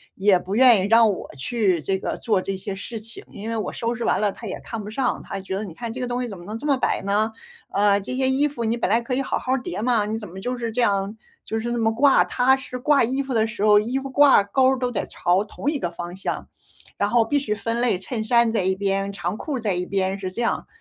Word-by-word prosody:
也 195 -1 +4
不 185 +2 -6
愿 240 -3 +6
意 190 - 0
让 225 +1 +6
我 - - -8
去 185 - 0
这 190 +5 -1
个 - - -4
做 210 -5 +1
这 195 +1 -3
些 190 +1 -5
事 225 +3 -6
情。 225 +2 -8
因 205 +2 -9
为 230 - -2
我 215 - -2
收 230 +1 -2
拾 235 - -4
完 - - +2
了 205 -1 +1
他 230 - -9
也 185 - -5
看 225 -2 -6
不 205 - -7
上， 255 +4 -1
他 195 - -5
觉 190 0 -5
得： 200 - -3
“你 190 -6 -8
看 230 +5 -6
这 255 - -6
个 250 - -2
东 245 +1 -2
西 250 - -2
怎 200 -4 -8
么 175 - -12
能 215 +5 -6
这 290 - -5
么 280 - +4
摆 260 - 0
呢？ 210 +3 +1 0.4
呃， 200 0 +3
这 255 +6 -5
些 260 0 +2
衣 280 +3 +2
服 235 -5 -4
你 225 +1 +1
本 235 - -1
来 230 - +5
可 235 +2 -4
以 260 - +1
好 270 - -2
好 255 - -1
儿 265 - 0
叠 190 -1 -4
吗？ 230 -3 +2
你 220 +1 -3
怎 210 - -8
么 190 +2 -9
就 250 +4 -3
是 235 -1 -3
这 245 - 0
样 200 -1 +1 0.3
就 220 - -3
是 235 +2 -3
那 240 - -1
么 225 -1 +1
挂。” 275 +4 +5
他 260 +2 +3
是 255 -1 -7
挂 290 +2 +3
衣 265 +4 -1
服 270 -1 -4
的 220 -1 +2
时 220 -2 -4
候， 210 -1 +7
衣 235 +5 -2
服 270 0 -4
挂 275 -5 +6
钩 260 +6 +3
儿 - - -2
都 250 -1 -1
得 - - -3
朝 180 +4 +1
同 275 +6 -3
一 295 - -2
个 175 - -2
方 175 +1 -7
向。 195 - -4 0.5
然 200 - +1
后 235 +1 +4
必 285 +6 +1
须 225 -6 -2
分 230 +2 -2
类， 245 -6 +3
衬 220 +4 -4
衫 235 0 +4
在 220 -4 0
一 190 +1 +1
边、 195 0 -1
长 180 -1 -3
裤 290 +1 -3
在 215 -4 0
一 180 0 -2
边 190 0 -1
是 190 -1 -3
这 235 - -3
样。 230 - -1
225 Hz, 315 characters per minute, -23 LUFS, 195-245 Hz, 0.5 s, 候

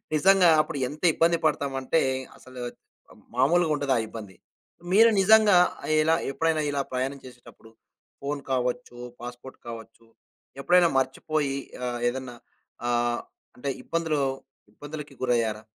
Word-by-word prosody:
నిజంగా 190 +2 +5
అప్పుడు 155 -1 -6
ఎంత 150 +2 -11
ఇబ్బంది 170 +2 +3
పడతాం 140 -3 0
అంటే 145 +5 +1 0.4
అసలు 130 -1 -11 0.5
ఆహ్! - - -18 0.2
మామూలుగా 160 +5 +3
ఉండదా 140 -3 +1
ఇబ్బంది. 105 -4 -9 0.6
మీరు 225 +3 +7
నిజంగా 210 -1 +6 0.4
ఇలా 160 +1 +3 0.2
ఎప్పుడైనా 160 +2 0
ఇలా 140 -1 0
ప్రయాణం 130 +2 -2
చేసేటప్పుడు 120 -3 -15 0.5
ఫోన్ 140 +1 -3
కావచ్చు, 125 -1 -2 0.2
పాస్‌పోర్ట్ 120 +2 -9
కావచ్చు. 115 0 -10 0.5
ఎప్పుడైనా 175 +4 +4
మర్చిపోయి 140 +2 -1 0.3
ఆహ్, 120 -1 -3
ఏదన్నా 130 -1 -6 0.5
ఆహ్, 120 0 +1 0.4
అంటే 140 +3 -4
ఇబ్బందులు 165 -3 -1 0.5
ఇబ్బందులికి 145 +4 -9
గురయ్యారా? 115 -4 0
135 Hz, 120 wpm, -26 LUFS, 125-160 Hz, 0.6 s, మీరు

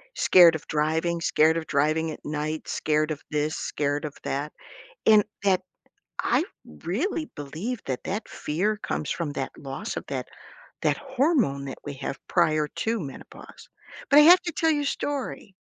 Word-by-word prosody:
Scared 170 -3 +7
of 155 - -6
driving, 160 +3 0
scared 160 0 +3
of 160 - -4
driving 155 +3 +1
at - - -10
night, 150 +1 -3
scared 155 0 0
of 150 - -4
this, 150 0 -1
scared 145 0 -2
of 145 - -6
that, 145 +2 -3 0.5
and 215 -2 +7 0.2
that 190 -2 +3 0.6
I - - +2 0.2
really 225 - -3
believe 165 - -5
that, 130 -3 -3
that 205 +4 -3
fear 195 +8 -1
comes 180 -7 -3
from 165 -4 -2
that 135 -2 -4
loss 145 +10 -6
of - - -4
that - - -4 0.5
that - - +2
hormone 265 - +1
that 135 - -6
we 145 - -5
have 135 +1 -5
prior 155 -3 +2
to 225 +9 -2
menopause. 140 -5 -10 0.4
But 285 - +7
I - - +10
have 355 +4 +8
to 345 - -3
tell 325 0 +2
you 295 -2 +1
a - - -2
story. 275 -8 -3
160 Hz, 170 wpm, -26 LUFS, 150-215 Hz, 0.6 s, I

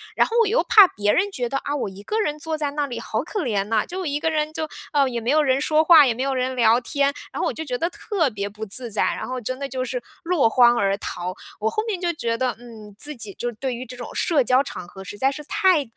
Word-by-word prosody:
然 - - +4
后 460 - -4
我 455 - +3
又 460 +5 +2
怕 410 -4 +8
别 210 -6 0
人 400 +2 +1
觉 250 -8 -2
得， 275 - -1
啊， 285 - -3
我 260 -8 -2
一 190 +1 -11
个 435 - -2
人 300 -8 -1
坐 320 0 -3
在 295 -2 -1
那 290 0 -1
里 240 -2 -5
好 220 -1 -2
可 400 +2 -3
怜 210 -6 0
呐， 215 0 +1
就 370 +1 -5
一 290 -1 -1
个 320 - 0
人 305 -1 -1
就 315 0 -3 0.3
呃， 280 -2 +4
也 240 - -3
没 235 - -3
有 310 - +4
人 265 -1 +2
说 310 +1 +3
话， 320 -2 +8
也 245 - +2
没 250 +4 -3
有 275 - 0
人 255 0 -1
聊 235 -1 +4
天。 280 +2 0 0.2
然 - - -6
后 - - +1
我 - - -1
就 320 - -5
觉 250 -3 -2
得 335 +6 -1
特 360 - -1
别 200 -2 -4
不 215 +2 -7
自 235 +4 -2
在， 210 - +1
然 - - -2
后 255 0 -3
真 255 +3 -4
的 280 - -3
就 255 0 -3
是 250 -1 -3 0.2
落 330 -9 +3
荒 240 0 +5
而 195 0 +1
逃。 180 -2 -5 0.3
我 220 - +1
后 430 - -1
面 400 -5 -2
就 350 -1 0
觉 230 -6 -2
得， 255 -1 0
嗯， 220 -4 -12
自 300 +4 -2
己 215 -4 -8
就 240 0 -2
对 250 +3 -3
于 250 +2 -6
这 250 +1 -9
种 245 - -8
社 300 -7 +2
交 255 +3 +3
场 180 -10 -8
合 190 +2 -11
实 205 +2 -8
在 270 +3 +2
是 300 +2 -7
太， 365 -4 +3
260 Hz, 310 characters per minute, -23 LUFS, 230-310 Hz, 0.3 s, 怕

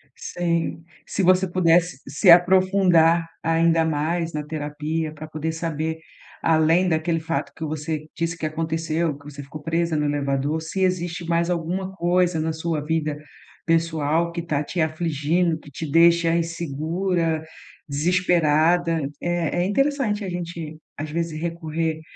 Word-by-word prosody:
Sim, 170 -1 -2 0.2
se 195 - -2
você 185 +1 +4
pudesse 175 -3 +2
se 150 +7 +2
aprofundar 175 -2 +5
ainda 165 0 +3
mais 165 +2 -1
na 150 0 -3
terapia 150 +1 -3
para 155 0 -9
poder 155 +1 -3
saber, 160 -1 -3 0.4
além 165 +3 +3
daquele 165 0 0
fato 160 -3 -3
que 160 - -7
você 155 0 -4
disse 165 +1 -2
que 160 - -4
aconteceu, 160 0 -1
que 145 - -19
você 145 -1 -8
ficou 150 +2 -10
presa 165 +1 0
no 150 -1 +1
elevador, 145 +1 -1
se 165 +4 -4
existe 175 -1 -1
mais 170 +1 +1
alguma 180 +3 -2
coisa 175 -1 +2
na 160 +1 0
sua 160 -2 -2
vida 155 -1 -1 0.5
pessoal 165 0 +1
que 170 0 -4
está 150 -3 -1
te 170 +3 -2
afligindo, 160 +1 0
que 145 - -15
te 155 +3 -5
deixa 170 +1 +5
insegura, 165 +1 -1 0.4
desesperada. 165 +1 +2 0.2
É 175 0 0
é - - +1
interessante 235 -1 +1
a - - -4
gente 170 -3 -5 0.2
às 155 +1 -4
vezes 165 0 -3
recorrer 165 -1 -2
165 Hz, 145 wpm, -23 LUFS, 155-175 Hz, 0.5 s, aprofundar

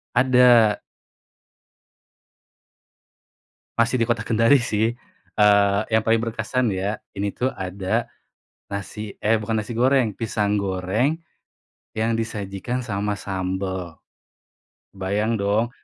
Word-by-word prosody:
Ada. 125 -4 +5 3.0
Masih 115 +1 +2
di 115 - +1
Kota 115 -2 0
Kendari, 115 +5 +4
sih. 110 -2 0 0.5
Eee 100 -1 +5 0.2
yang 110 - +4
paling 115 +1 +3
berkesan 115 0 -1
ya, 100 +3 -2 0.2
ini 100 0 -2
tuh 130 +6 -2
ada 95 0 -2 0.6
nasi 100 +1 -6
eh, 110 +1 +3
bukan 110 0 -1
nasi 110 - -7
goreng, 130 -2 +3
pisang 105 -2 0
goreng, 100 - 0 0.8
yang 110 +1 0
disajikan 110 +1 -3
sama 105 -3 -3
sambal. 95 -2 -4 0.9
Kebayang 105 +4 -1
dong, 105 +4 +1
105 Hz, 100 wpm, -23 LUFS, 100-115 Hz, 3.0 s, Ada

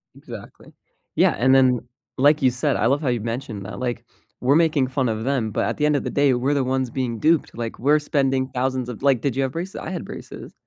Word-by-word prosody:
Exactly. - - -12 0.4
Yeah, - - +4
and 130 +5 +3
then, 130 -2 +4 0.4
like 145 +3 +4
you 130 -2 +4
said, 130 +3 0
I - - 0
love 140 +4 +1
how 145 - -2
you've 120 -3 -1
mentioned 115 -3 -5
that, 100 - -7
like, 120 -2 -3 0.4
we're 130 +3 +3
making 155 -5 +3
fun 130 -1 0
of 110 0 -3
them, 125 -4 -1
but - - -1
at - - -2
the 150 - +1
end 150 0 +3
of 140 - -1
the - - -3
day, 140 -2 +3
we're 130 +4 0
the 140 -2 +1
ones 130 0 -1
being 120 -2 -3
duped, 160 +3 +2
like, 115 -1 -5
we're 145 +5 +3
spending 135 -3 0
thousands 130 -1 -2
of 120 - -7
like, 135 -4 +3
did 135 -4 -1
you 135 - +1
have 135 - -2
braces? 180 +4 -5
I - - -6
had - - -4
braces. - - -9
130 Hz, 250 wpm, -22 LUFS, 120-140 Hz, 0.4 s, Yeah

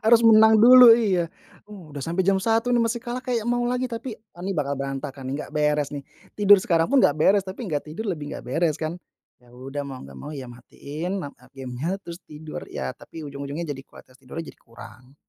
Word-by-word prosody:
Harus 230 +1 +5
menang 220 0 +7
dulu, 240 0 +9
iya. 185 -7 0 0.4
Uh, 185 -8 -12
udah 140 - -5
sampai 170 +5 -1
jam 195 -1 +3
1.00 230 +3 +1
nih 235 - +3
masih 230 +1 -1
kalah 245 +1 -5
kayak 240 -3 -2
mau 240 0 +1
lagi, 250 +1 -1
tapi 235 0 -6
eee, 210 -5 -16
nih 190 - -3
bakal 140 -1 -1
berantakan 135 0 -5
nih, 135 - -3
nggak - - -17
beres 150 -1 +1
nih, 140 - -5 0.3
tidur 205 -1 +6
sekarang 165 -1 +1
pun 280 - +4
nggak 145 - +4
beres, 195 +5 +3
tapi 190 +6 -7
nggak 150 0 -2
tidur 200 +7 -4
lebih 150 -4 -5
nggak - - -7
beres 155 +5 0
kan? 160 +2 -4 0.4
Ya 120 - -21
udah 135 +3 -6
mau 135 -2 -7
gak 70 -1 -12
mau 150 - -8
ya 130 -3 -8
matiin, 160 +9 -6
mat 140 - -6
eee, - - -22
gamenya 130 +8 -3
terus 170 -2 -8
tidur 155 +1 -9
ya, 65 - -4
tapi 160 - -10
ujung-ujungnya 140 +2 -6
jadi 135 -2 -6
kualitas 130 +1 -18
tidurnya 140 +5 -8
jadi - - -25
kurang. 120 +3 -15
165 Hz, 220 wpm, -24 LUFS, 140-220 Hz, 0.4 s, dulu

